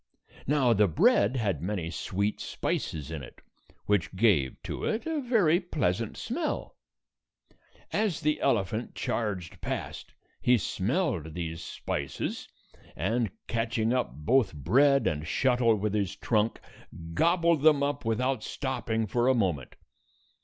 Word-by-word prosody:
Now 135 Hz, -4 st, +4 dB
the 105 Hz, -1 st, +4 dB
bread 100 Hz, +7 st, +3 dB
had 100 Hz, -, -1 dB
many 90 Hz, -3 st, -3 dB
sweet 100 Hz, +4 st, -2 dB
spices 75 Hz, -1 st, -3 dB
in 80 Hz, -3 st, -4 dB
it, 65 Hz, -, -12 dB, 0.5 s
which 100 Hz, -3 st, 0 dB
gave 90 Hz, -, +3 dB
to -, -, -5 dB
it 220 Hz, -, -1 dB
a 320 Hz, -2 st, -1 dB
very 205 Hz, -, +3 dB
pleasant 115 Hz, -, -1 dB
smell. 300 Hz, +6 st, -3 dB, 1.2 s
As 210 Hz, -6 st, +1 dB
the 150 Hz, -1 st, 0 dB
elephant 110 Hz, +2 st, 0 dB
charged 100 Hz, -7 st, -3 dB
past, -, -, -5 dB, 0.3 s
he 125 Hz, 0 st, +4 dB
smelled 100 Hz, -, -1 dB
these 80 Hz, -1 st, -4 dB
spices, -, -, -4 dB, 0.5 s
and, 110 Hz, +7 st, 0 dB, 0.2 s
catching 115 Hz, 0 st, 0 dB
up 125 Hz, -, 0 dB
both 95 Hz, -, +2 dB
bread 135 Hz, -, +4 dB
and 75 Hz, +1 st, -1 dB
shuttle 125 Hz, -1 st, +3 dB
with 105 Hz, 0 st, -2 dB
his 100 Hz, -4 st, -1 dB
trunk, 110 Hz, 0 st, 0 dB, 0.5 s
gobbled 170 Hz, -, +3 dB
them 150 Hz, -2 st, +5 dB
up 145 Hz, +1 st, -1 dB
without 125 Hz, +2 st, 0 dB
stopping 120 Hz, -4 st, -2 dB
for 120 Hz, +4 st, +1 dB
a 130 Hz, -, +4 dB
moment. 90 Hz, -, -1 dB
115 Hz, 130 wpm, -28 LUFS, 95-140 Hz, 1.2 s, them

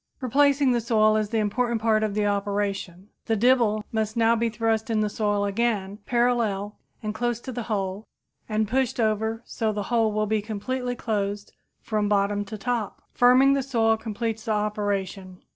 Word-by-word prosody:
Replacing 275 Hz, +1 st, +3 dB
the 240 Hz, -1 st, +1 dB
soil 215 Hz, -2 st, +3 dB
is 215 Hz, -1 st, 0 dB
the 225 Hz, -, -1 dB
important 230 Hz, +2 st, 0 dB
part 220 Hz, -1 st, +2 dB
of 215 Hz, -2 st, -1 dB
the 210 Hz, -1 st, +1 dB
operation. 200 Hz, -2 st, -2 dB, 0.2 s
The 225 Hz, -, +2 dB
dibble 225 Hz, -2 st, +3 dB
must 220 Hz, 0 st, -2 dB
now 230 Hz, 0 st, +4 dB
be 230 Hz, 0 st, 0 dB
thrust 225 Hz, 0 st, -1 dB
in 220 Hz, -1 st, +1 dB
the 210 Hz, -1 st, 0 dB
soil 205 Hz, -1 st, 0 dB
again, 205 Hz, -1 st, -1 dB
parallel 230 Hz, -4 st, +1 dB, 0.3 s
and 215 Hz, 0 st, -2 dB
close 240 Hz, +1 st, -1 dB
to 260 Hz, -, -6 dB
the 245 Hz, 0 st, -4 dB
hole, 195 Hz, 0 st, -2 dB, 0.4 s
and 215 Hz, 0 st, +1 dB
the 210 Hz, -, -13 dB
soil 260 Hz, -, +3 dB
pushed 260 Hz, -1 st, -3 dB
over 220 Hz, +1 st, 0 dB
so 220 Hz, -2 st, -2 dB
the 205 Hz, -1 st, -3 dB
hole 225 Hz, -2 st, +3 dB
will 215 Hz, 0 st, 0 dB
be 215 Hz, 0 st, 0 dB
completely 245 Hz, +4 st, -3 dB
closed 205 Hz, -3 st, -3 dB, 0.3 s
from 210 Hz, -2 st, -1 dB
bottom 205 Hz, 0 st, +1 dB
to 215 Hz, +2 st, -7 dB
top. 235 Hz, -1 st, -3 dB
Firming 255 Hz, +3 st, +6 dB
the 275 Hz, -, +1 dB
soil 230 Hz, -4 st, +2 dB
completes 220 Hz, 0 st, -4 dB
the 220 Hz, -, 0 dB
operation. 200 Hz, -3 st, -3 dB
215 Hz, 185 wpm, -25 LUFS, 205-235 Hz, 0.4 s, Firming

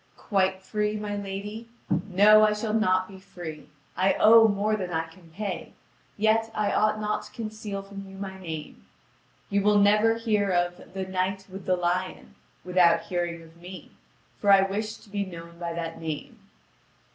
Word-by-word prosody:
"Quite 190 Hz, -2 st, 0 dB
free, 210 Hz, +1 st, -1 dB
my 210 Hz, -1 st, -4 dB
lady? 205 Hz, +3 st, -6 dB, 0.4 s
No, 210 Hz, +3 st, +7 dB
I 215 Hz, 0 st, +4 dB
shall 210 Hz, 0 st, -3 dB
not 185 Hz, -4 st, +2 dB
be 190 Hz, -1 st, -12 dB
free. 175 Hz, -5 st, -9 dB, 0.3 s
I 190 Hz, +1 st, +3 dB
owe 225 Hz, +1 st, +7 dB
more 210 Hz, +1 st, +1 dB
than 185 Hz, -4 st, -4 dB
I 165 Hz, -1 st, -1 dB
can 165 Hz, +1 st, -17 dB
pay. 195 Hz, +2 st, -5 dB, 0.4 s
Yet, 220 Hz, +1 st, +2 dB
I 210 Hz, -1 st, +1 dB
ought 215 Hz, 0 st, +2 dB
not 210 Hz, 0 st, -1 dB
to -, -, -13 dB
conceal 215 Hz, -3 st, -6 dB
from 195 Hz, 0 st, -9 dB
you 195 Hz, -, -11 dB
my 190 Hz, -1 st, -6 dB
name. 160 Hz, -, -7 dB, 0.7 s
You 200 Hz, 0 st, +2 dB
will 210 Hz, +1 st, +4 dB
never 210 Hz, +2 st, +4 dB
hear 215 Hz, -3 st, 0 dB
of 175 Hz, 0 st, -1 dB
'The 190 Hz, -1 st, -2 dB
Knight 190 Hz, +1 st, -2 dB
with 190 Hz, 0 st, -9 dB
the 185 Hz, -, +3 dB
Lion' 175 Hz, -, -2 dB, 0.3 s
without 180 Hz, -2 st, +4 dB
hearing 175 Hz, -2 st, -2 dB
of 165 Hz, +1 st, -17 dB
me; 180 Hz, +2 st, -11 dB, 0.5 s
for 205 Hz, -, +3 dB
I 195 Hz, -1 st, +7 dB
wish 210 Hz, +3 st, -3 dB
to -, -, -19 dB
be 200 Hz, -1 st, -1 dB
known 170 Hz, -2 st, -10 dB
by 170 Hz, -1 st, -3 dB
that 165 Hz, -1 st, -5 dB
name." 190 Hz, -, -6 dB
195 Hz, 175 wpm, -26 LUFS, 180-210 Hz, 0.7 s, No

